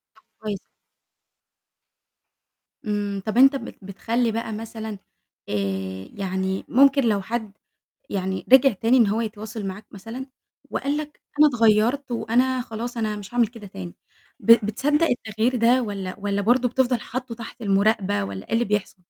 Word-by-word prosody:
طَب - - -24 0.2
كويس 210 -3 -3 2.3
إمم، 205 -2 -2
طَب 215 +2 -2
أنت 270 +2 +7
بت - - -6
بتخلّي 225 +5 -1
بقى 225 0 -3
مثلًا، 220 -1 -6 0.5
آآ، 95 -2 -3
يعني 190 -1 -2
ممكن 275 +1 +5
لو 210 -4 +2
حد 220 0 -4 0.6
يعني 190 -2 -3
رجع 265 -1 +8
تاني 225 +6 +2
إن 230 -4 +6
هو 215 +3 0
يتواصل 215 -1 -5
معاك 195 +3 -7
مثلًا 225 +6 -8 0.4
وقال 285 +2 -1
لك، 300 -1 -6 0.2
أنا 305 - +8
اتغيّرت 235 +3 +2
وأنا 250 +2 +1
خلاص 235 +1 -5
أنا 215 -2 -1
مش 205 +3 -10
هاعمل 240 -2 +4
كده 225 -2 -12
تاني، 90 - -8 0.5
ب - - -14 0.2
بتصدّق 295 +9 +1
التغيير 230 +1 0
ده 245 +2 +4
والّا 195 -4 -4
والّا 200 0 -1
برضه 245 +3 +3
بتفضل 250 -1 +1
حاطُّه 250 0 -5
تحت 230 +1 -10
المُراقبة 195 - +2
والّا 95 -1 -7
إيه - - -9
اللي 235 +1 +3
بيحصل؟ 205 -2 -2
220 Hz, 150 wpm, -24 LUFS, 200-245 Hz, 2.3 s, رجع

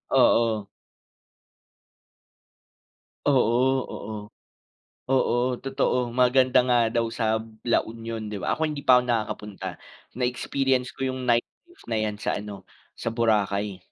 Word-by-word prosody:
Oo. 110 -3 +3 2.6
Oo, 130 0 +3
oo. 110 - -7 0.9
Oo, 125 -1 +2
totoo. 135 -2 0
Maganda 130 0 +4
nga 125 - +4 0.2
daw 115 -1 +1
sa 110 -1 0 0.3
La - - +4
Union, 115 -1 -6
di 105 - -3
ba? - - 0
Ako 160 - -2
hindi 145 -2 -6
pa 125 -1 +7
ako - - -7
nakakapunta. 105 -4 -3 0.5
Na-experience 125 +1 0
ko 135 0 -2
yung 130 0 -5
nightlife 125 - -2
na 115 - 0
'yan 105 -1 -1
sa - - -1
ano, 105 -1 -8 0.3
sa - - -3
Boracay. 105 -4 0
120 Hz, 120 wpm, -25 LUFS, 110-130 Hz, 2.6 s, pa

